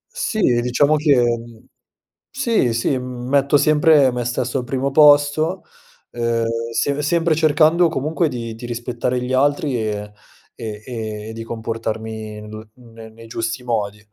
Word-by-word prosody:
Sì, 365 - -2 0.2
diciamo 140 +5 +2
che 150 -1 +3 1.1
Sì, 235 - +1
sì, 125 +3 0
m 125 -1 -7
metto 140 +1 +3
sempre 150 -2 +4
me 120 0 -3
stesso 125 +2 -2
al - - -4
primo 135 +2 -2
posto. 150 +4 +4 0.5
Ehm, 115 -1 -1 0.3
se 145 +3 0
sempre 165 +1 +2
cercando 160 +2 +4
comunque 160 +3 -1
di 115 -3 -5
di 120 +2 -9
rispettare 120 +1 -2
gli 125 +1 -3
altri, 145 +1 +1
e 105 -2 -4 0.4
e 110 -1 -6
e 110 - -7
di 115 - -7
comportarmi 110 -1 -5
n 110 0 -10
ne 115 -3 -13
nei 115 +1 -14
giusti 115 +1 -4
modi, 105 -4 -2
125 Hz, 140 wpm, -20 LUFS, 115-145 Hz, 1.1 s, sempre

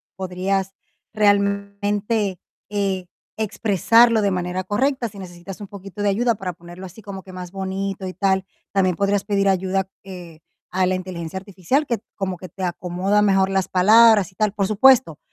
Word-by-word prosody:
Podrías 190 +1 -2 0.4
realmente, 200 0 +1 0.3
eh, 195 -3 -1 0.3
expresarlo 220 +2 +3
de 200 -1 +1
manera 180 +1 -2
correcta. 245 +4 0
Si 200 - -13
necesitas 180 +1 -9
un 205 - -7
poquito 195 0 -9
de 205 - +2
ayuda 230 +3 +1
para 185 -3 -5
ponerlo 175 +2 -11
así 190 +5 -12
como 195 -2 -8
que 185 - -12
más 180 -1 -7
bonito 195 0 -4
y 185 - -6
tal, 190 0 +1 0.3
también 185 -3 +2
podrías 200 0 +1
pedir 200 -1 +1
ayuda, 190 0 0
eh, 175 -4 -10 0.3
a 185 0 +1
la 185 0 +1
inteligencia 180 -1 -6
artificial, 200 - -1
que 235 -5 -1 0.2
como 190 -2 -2
que 185 +1 -10
te 190 - -8
acomoda 180 +3 0
mejor 195 -2 +3
las 190 -1 0
palabras 210 0 +6
y - - -34
tal. 210 0 +1
Por 200 -2 0
supuesto, 215 - +4
195 Hz, 170 wpm, -22 LUFS, 185-205 Hz, 0.4 s, palabras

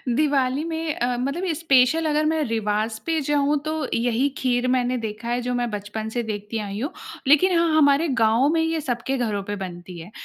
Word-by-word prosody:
दिवाली 280 -1 +1
में 325 -1 -3
अ, 245 0 -1
मतलब 280 +9 -2
स्पेशल 295 0 +3
अगर 305 0 +1
मैं 315 0 +1
रिवाज़ 220 -1 -1
पे 325 -1 0
जाऊँ 290 +1 +1
तो 310 - -1 0.2
यही 240 +3 +1
खीर 250 -1 0
मैंने 250 0 +1
देखा 225 0 -5
है 240 +1 0
जो 250 +1 -2
मैं 245 -1 -1
बचपन 210 +1 -5
से 240 +2 -2
देखती 210 0 -4
आई 205 -1 -5
हूँ। 280 +8 -3 0.4
लेकिन 335 +6 +5
हाँ, 335 -2 +2
हमारे 285 +2 +4
गाँव 240 -1 +3
में 325 - +2
ये 325 0 0
सबके 265 -1 -2
घरों 215 -5 -1
पे 205 +1 -4
बनती 180 -2 -8
है। 170 +5 -10
250 Hz, 200 wpm, -23 LUFS, 220-300 Hz, 0.4 s, लेकिन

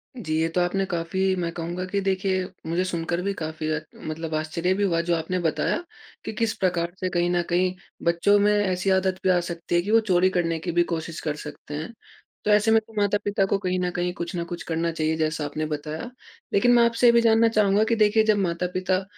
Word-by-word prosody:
जी। 170 -11 -4
ये 165 - +2
तो 180 +2 0
आपने 195 +2 0
काफ़ी 185 +3 0
मैं 170 -2 -2
कहूँगा 175 +2 -4
कि 200 +2 -1
देखिए 190 -1 0 0.2
मुझे 170 +3 0
सुनकर 170 -1 -2
भी 200 +2 -1
काफ़ी 155 -3 -5
अ, 155 - 0 0.2
मतलब 155 +1 -6
आश्चर्य 155 +4 0
भी 200 +2 -1
हुआ 170 -4 +2
जो 170 - +4
आपने 165 +3 -2
बताया 165 - 0 0.5
कि - - -4
किस 220 0 0
प्रकार 175 -2 0
से 185 - -1
कहीं 175 -1 +1
न 175 0 +2
कहीं 180 +1 +2 0.3
बच्चों 170 +4 +4
में 205 +1 +4
ऐसी 195 -2 0
आदत 190 0 +1
भी 190 - +2
आ 180 -1 +4
सकती 175 0 -4
है 175 - +4
कि 200 +4 -3
वो 225 - +6
चोरी 185 0 +4
करने 165 -3 0
की 175 +2 -3
भी 175 +1 +3
कोशिश 165 0 -4
कर 150 -1 -2
सकते 150 0 -9
हैं। 155 +8 -5 0.5
तो 210 - +3
ऐसे 210 +2 +4
में 225 - +6
तो 220 +1 -20
माता-पिता 205 -1 +1
को 195 - +1
कहीं 185 -1 -1
न 180 0 0
कहीं 175 0 -2
कुछ 170 0 -5
न 170 - -1
कुछ 175 0 -5
करना 165 0 -1
चाहिए 160 -1 -1
जैसा 155 -1 -1
आपने 155 +2 -3
बताया। 155 +7 -5 0.4
लेकिन 245 +5 +4
मैं 240 -1 +6
आपसे 235 +1 +3
ये - - +8
भी 235 - +5
जानना 230 0 +5
चाहूँगा 210 -1 +3
कि 230 +1 +1
देखिए 220 0 +4
जब 215 -1 +3
माता-पिता 185 +1 -1
180 Hz, 230 wpm, -24 LUFS, 165-200 Hz, 0.5 s, ये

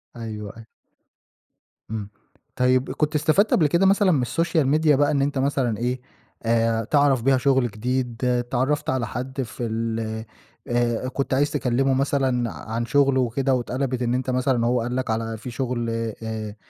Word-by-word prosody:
أيوه، 115 -1 -7 0.3
أيوه. 115 - -12 1.2
إمم. 105 -2 -4 0.5
طيب 130 +1 +2
كنت 150 0 -1
استفدت 155 +8 +3
قبل 155 - +4
كده 170 +6 +2
مثلًا 195 -1 +4
من 130 -6 +2
الSocial 165 +1 +1
Media 150 +1 +3
بقى 145 +1 +3
إن 140 -2 +1
أنت 140 0 0
مثلًا 130 -4 0
إيه، 125 +3 -2 0.4
آآ 115 0 +1
تعرف 140 0 +3
بيها 135 0 +4
شُغل 130 -1 +2
جديد، 125 +2 -2
اتعرَّفت 125 +3 0
على 130 -3 0
حد 130 +3 -4
في 120 0 -6
ال 110 -1 -3 0.4
آآ 120 0 0
كنت 135 +1 -2
عايز 145 +2 +2
تكلِّمه 135 -1 +1
مثلًا 130 -3 +1
عن 115 +1 -4
شُغله 140 -1 +3
وكده 130 +3 0
واتقلَبِت 130 +1 -1
إن 120 0 0
أنت 130 +1 -1
مثلًا 130 -2 +1
هو 120 0 +2
قال 125 +2 -3
لك 130 -2 -2
على 115 0 -2
في 125 +3 -8
شُغل 120 -1 -2 0.3
آآ 110 -1 -5
125 Hz, 165 wpm, -23 LUFS, 115-140 Hz, 1.2 s, قبل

